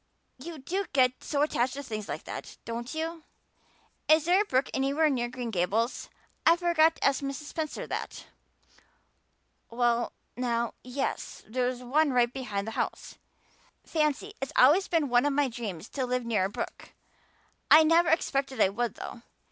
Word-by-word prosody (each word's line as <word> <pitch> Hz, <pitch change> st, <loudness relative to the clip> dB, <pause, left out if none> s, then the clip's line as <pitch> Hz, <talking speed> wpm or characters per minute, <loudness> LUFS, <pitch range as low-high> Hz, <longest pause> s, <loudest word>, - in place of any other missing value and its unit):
You 325 Hz, +4 st, -7 dB
do 370 Hz, +8 st, -3 dB
get 255 Hz, -2 st, +2 dB
so 290 Hz, -1 st, 0 dB
attached 255 Hz, -4 st, 0 dB
to 280 Hz, -, -5 dB
things 215 Hz, -5 st, -6 dB
like -, -, -4 dB
that, -, -, -8 dB
don't 235 Hz, +5 st, -5 dB
you? 325 Hz, +1 st, -3 dB, 0.9 s
Is 310 Hz, 0 st, +5 dB
there 360 Hz, +4 st, +4 dB
a -, -, -1 dB
brook 260 Hz, -7 st, +1 dB
anywhere 280 Hz, +3 st, +2 dB
near 240 Hz, -3 st, -1 dB
Green 245 Hz, -2 st, -5 dB
Gables? 210 Hz, +6 st, 0 dB, 0.3 s
I 330 Hz, -, +6 dB
forgot 330 Hz, -2 st, +3 dB
to -, -, -3 dB
ask 275 Hz, 0 st, +3 dB
Mrs. 275 Hz, +1 st, -4 dB
Spencer 310 Hz, +1 st, -4 dB
that." -, -, -5 dB, 1.4 s
"Well 240 Hz, 0 st, +1 dB, 0.2 s
now, 235 Hz, -1 st, -1 dB
yes, 255 Hz, +2 st, -4 dB
there's 250 Hz, +2 st, -1 dB
one 285 Hz, +3 st, +2 dB
right 240 Hz, -1 st, +3 dB
below 215 Hz, -7 st, -3 dB
the 225 Hz, -, -5 dB
house." -, -, -4 dB, 0.6 s
"Fancy. 310 Hz, +6 st, -1 dB
It's 270 Hz, -, -3 dB
always 305 Hz, +10 st, +6 dB
been 325 Hz, -4 st, +1 dB
one 245 Hz, +2 st, +3 dB
of 290 Hz, -, +1 dB
my 285 Hz, 0 st, +2 dB
dreams 220 Hz, -7 st, -6 dB
to 260 Hz, -3 st, -2 dB
live 250 Hz, -1 st, -1 dB
near 215 Hz, -5 st, +1 dB
a -, -, -2 dB
brook. 205 Hz, -, -6 dB, 0.8 s
I 315 Hz, +1 st, +9 dB
never 330 Hz, +2 st, +4 dB
expected 275 Hz, -5 st, 0 dB
I 195 Hz, -, +5 dB
would, 230 Hz, +2 st, -2 dB
though. 235 Hz, -, -8 dB
260 Hz, 165 wpm, -28 LUFS, 240-310 Hz, 1.4 s, I